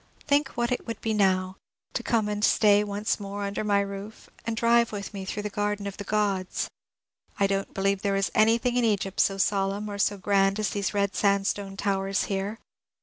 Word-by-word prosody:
Think 285 -1 +3
what 240 +1 0
it 250 - -2
would 230 - -4
be 225 - -1
now 190 -2 +1 0.2
— - - -45
to - - -1
come 225 -3 +1
and 210 0 -2
stay 210 -2 +5
once 205 +2 -2
more 200 0 -5
under 200 +1 -2
my 205 -1 +3
roof, 200 +2 -7 0.2
and 225 -1 -2
drive 235 0 +3
with 205 0 -6
me 195 -1 -5
through 205 +2 -4
the 210 - -4
Garden 205 0 -1
of 200 -1 -5
the 205 - -5
Grods 200 -3 0 0.7
I - - +3
I - - +6
don't 195 0 -1
believe 195 0 +1
thero 200 -1 +1
is 195 - 0
anything 230 +3 +3
in 245 - +3
Egypt 200 -3 0
so 195 - +3
solemn 195 +1 0
or 200 - -6
so 205 +1 +2
grand 195 0 +2
as 210 -4 0
these 205 0 -2
red 200 -1 +1
sandstone 200 -1 0
towers 195 0 0
here. 200 +2 -3
200 Hz, 210 wpm, -27 LUFS, 195-215 Hz, 0.7 s, I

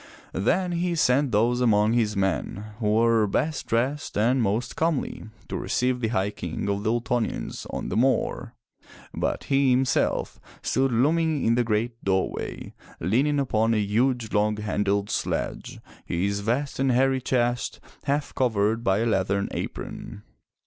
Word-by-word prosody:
Then 175 - +1
he 175 0 0
sent 140 -3 +3
those 120 +4 +2
among 110 -2 +3
his 110 -3 +1
men 100 +2 -2
who 105 -2 +1
were 115 -1 +4
best 150 +9 -1
dressed 130 +5 -1
and 120 +5 +3
most 110 +3 -1
comely 160 -4 -1 0.2
to - - -5
receive 125 0 0
the 115 - 0
High 100 -2 0
King 85 0 -5
of 100 0 -1
the 105 - 0
Ultonians 120 0 -2
on - - -4
the - - -3
moor, 125 0 0 0.6
but - - -2
he 135 -1 +2
himself 130 +1 +1 0.2
stood 135 0 +1
looming 155 +5 +2
in 115 - +4
the 120 +1 +2
great 115 +1 -1
doorway, 95 -1 -2 0.3
leaning 135 - +1
upon 115 -4 +1
a - - +2
huge, 115 +3 0
long 105 0 +2
handled 105 -1 -1
sledge, - - -3 0.2
his 100 +4 -1
vast 125 +8 -1
and 135 -1 +2
hairy 130 +1 +2
chest, 120 -1 0 0.3
half 145 +1 -1
covered 110 -2 +1
by 100 -1 +2
a - - +1
leathern 100 -2 0
apron. 105 - -6
115 Hz, 150 wpm, -25 LUFS, 105-130 Hz, 0.6 s, were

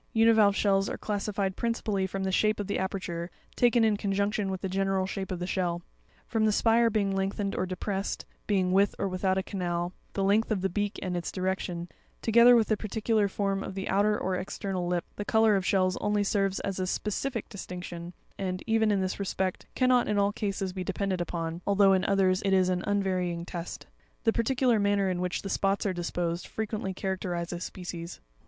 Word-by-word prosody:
Univalve 220 -3 +5
shells 195 -1 +2
are - - -4
classified 200 -2 -2
principally 215 -4 -1
from 195 +1 -4
the 190 - 0
shape 215 +3 +2
of 205 - -2
the 200 - -2
aperture, 180 -3 -3 0.3
taken 240 -1 +4
in 215 -2 +3
conjunction 200 0 0
with 190 -1 -3
the 195 - -1
general 195 0 0
shape 190 0 -4
of 185 - -2
the 175 - -3
shell; 175 -2 -1 0.4
from 225 -2 +1
the 215 - +4
spire 230 +2 +4
being 200 -3 0
lengthened 195 +1 -1
or 185 - -1
depressed, 190 +2 -3 0.2
being 190 -3 +2
with 195 +2 +3
or 200 - -1
without 185 0 0
a 190 - 0
canal, 175 -2 -2 0.2
the 195 - -1
length 205 +3 +3
of 210 -4 0
the 190 - +1
beak 205 +2 -1
and 180 -2 -2
its 175 - -3
direction, 185 -2 -2 0.3
together 235 +2 +6
with 225 -2 +4
the 215 - +4
particular 215 0 0
form 195 0 -1
of 190 - -6
the 195 0 -4
outer 210 +2 +3
or 185 0 -1
external 185 0 -3
lip: 175 -1 0
the 205 - -2
colour 220 0 +4
of 195 - +1
shells 185 -1 +2
only 210 0 +1
serves 195 -1 +1
as 195 -1 -3
a 185 - -1
specific 225 +5 -2
distinction, 180 -3 -7 0.3
and, 185 -1 -3
even 225 -1 +3
in 200 -2 +2
this 185 +1 -2
respect, 190 -1 -2
cannot 255 -1 +3
in 210 - +1
all 200 0 +2
cases 195 -3 -2
be 185 -1 -3
depended 190 0 -1
upon, 170 -1 -3
although, 200 -1 +5
in 190 0 +2
others, 190 -1 +3
it 195 -1 +2
is 185 -1 +4
an 180 0 0
unvarying 185 -4 0
test. 175 -1 -6 0.4
The 225 - +3
particular 245 -1 +2
manner 200 -1 +2
in 180 -1 -2
which 180 0 -2
the - - -4
spots 195 +1 +1
are 195 - +1
disposed, 175 0 -2
frequently 215 -3 -3
characterizes 180 -2 -3
species. 175 -2 -7
195 Hz, 200 wpm, -28 LUFS, 185-205 Hz, 0.4 s, together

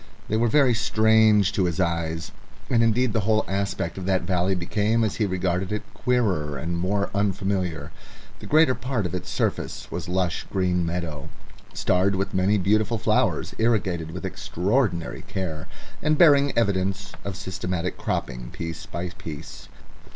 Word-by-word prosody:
They 110 - +1
were 115 +2 +3
very 130 +1 +4
strange 110 -3 +4
to 100 -2 +1
his 85 +1 -2
eyes, 85 -2 -1 0.4
and 120 -2 +4
indeed 115 +1 +2
the 110 - +2
whole 110 +1 +2
aspect 100 0 -2
of 90 - -5
that 95 -3 +2
valley 90 +1 +1
became, 105 +6 +1
as 110 - -1
he 105 - +1
regarded 90 0 -1
it, 105 - -2
queerer 95 - 0
and 85 +6 -3
more 100 +4 0
unfamiliar. 95 -4 -1 0.5
The - - -9
greater 155 -3 +5
part 125 -5 -2
of 90 - -3
its 90 - -4
surface - - -2
was 85 +1 -4
lush 90 -3 -1
green 90 -2 +1
meadow, 85 -4 -4 0.5
starred 95 +2 +2
with 100 +1 -2
many 95 +3 +3
beautiful 105 +4 +2
flowers, 100 - +1
irrigated 95 -8 +1
with 90 +3 -6
extraordinary 100 0 -1
care, 80 -5 -4 0.3
and 155 0 +2
bearing 145 -4 +6
evidence 100 -2 0
of 100 -2 -4
systematic 90 -1 -3
cropping - - -3
piece 80 -1 -6
by 90 +1 -4
piece. 80 -4 -9
95 Hz, 155 wpm, -25 LUFS, 90-110 Hz, 0.5 s, bearing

